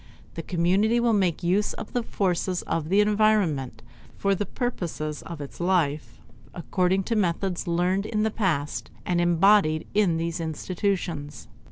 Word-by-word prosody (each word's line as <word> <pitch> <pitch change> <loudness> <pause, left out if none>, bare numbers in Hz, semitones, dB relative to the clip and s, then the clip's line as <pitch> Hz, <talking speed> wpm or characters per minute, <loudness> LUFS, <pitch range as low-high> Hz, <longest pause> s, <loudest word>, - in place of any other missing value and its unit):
The - - -5
community 190 +7 +2
will 235 -1 +2
make 185 -5 +1
use 190 +5 +1
of - - -9
the 245 - +1
forces 185 -4 -1
of 160 -1 -2
the 200 +3 +4
environment 205 - +1 0.3
for 200 0 +1
the 200 +1 -2
purposes 170 - -3
of 165 -3 -8
its 140 - -9
life 155 -9 0 0.4
according 185 +2 0
to 230 - -2
methods 185 -1 -1
learned 180 +4 +1
in 215 -1 0
the 220 - +1
past 165 -10 -1 0.2
and 175 -1 +1
embodied 175 -2 +4
in 195 -6 +2
these 165 +1 -2
institutions. 165 -2 -3
180 Hz, 150 wpm, -25 LUFS, 165-205 Hz, 0.4 s, the